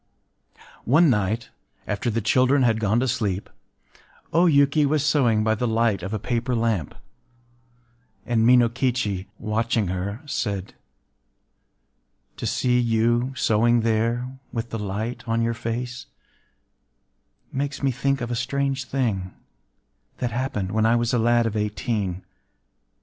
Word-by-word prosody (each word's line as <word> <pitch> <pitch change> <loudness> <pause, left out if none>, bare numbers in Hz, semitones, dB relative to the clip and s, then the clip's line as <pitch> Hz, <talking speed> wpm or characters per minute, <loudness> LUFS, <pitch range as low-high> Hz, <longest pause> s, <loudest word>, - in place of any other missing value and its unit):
One 150 +5 +5
night, 105 +1 -1 0.3
after 105 +4 -2
the 115 +1 -1
children 130 +5 +3
had 115 -2 +2
gone 110 +1 +2
to 130 - 0
sleep, 105 -6 -2 0.8
O 170 +3 +5
Yuki 145 -1 +4
was 145 +1 +1
sewing 125 -8 +3
by 110 0 +2
the 120 +3 -1
light 115 -3 +1
of 95 +3 -5
a 110 - -1
paper 120 +3 -2
lamp; 115 - -1 1.3
and 115 -2 +1
Minokichi, 120 -4 +2
watching 110 -2 -1
her, 100 - -4
said:— 100 -8 -3 1.6
“To - - -3
see 125 -1 +1
you 120 +2 +1
sewing 120 0 +3
there, 115 +3 -1
with 115 0 -4
the 115 - -3
light 105 +4 -4
on 115 0 +1
your 115 0 0
face, 120 +2 -5 1.4
makes 140 +1 -3
me 135 - +3
think 140 +2 -1
of 120 0 -3
a - - 0
strange 135 +2 -1
thing 105 -10 -2 0.8
that 120 -2 -2
happened 105 -6 -2
when 110 +1 +2
I 115 - +4
was 120 0 0
a 120 - +3
lad 120 +1 +3
of 110 -1 -2
eighteen. 105 -3 -2
115 Hz, 135 wpm, -24 LUFS, 110-125 Hz, 1.6 s, One